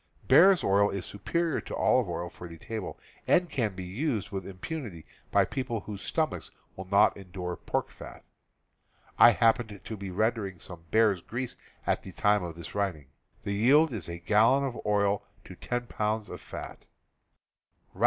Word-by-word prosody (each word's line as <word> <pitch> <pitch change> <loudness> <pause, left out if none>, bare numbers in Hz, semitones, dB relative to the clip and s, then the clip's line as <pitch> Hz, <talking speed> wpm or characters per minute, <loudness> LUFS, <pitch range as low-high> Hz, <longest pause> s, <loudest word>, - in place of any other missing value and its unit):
Bear's 190 0 +7
oil 100 +1 +4
is 100 -2 -4
superior 165 - -1
to - - -6
olive 125 -7 +2
oil 85 0 -3
for 90 +1 -10
the 85 -1 -11
table, 110 +3 -6 0.3
and 175 -1 +3
can 110 -7 -1
be 95 - -6
used 105 - -2
with 95 -2 -4
impunity 100 - -6 0.2
by - - +4
people 120 -5 -3
whose 100 0 -7
stomachs - - -1 0.3
will 95 - -7
not 100 +2 +4
endure 90 -2 -6
pork - - -3
fat. - - -11 1.0
I - - +10
happen 115 -2 +2
to 110 +4 -7
be 100 -1 -6
rendering 100 -1 -1
some 85 0 -10
bear's 110 -3 +3
grease 120 +6 -5 0.3
at - - +1
the - - -10
time 105 0 +3
of 85 -2 -5
this 85 -1 -8
writing. 90 -9 -2 0.3
The 100 - -2
yield 135 +8 +4
is 90 -7 -5
a 85 - -5
gallon 110 +10 +4
of 130 -3 -3
oil 100 -1 +2 0.2
to - - -11
ten 120 0 -3
pounds 110 -1 -2
of - - -8
fat. - - -9
105 Hz, 170 wpm, -29 LUFS, 95-120 Hz, 1.0 s, I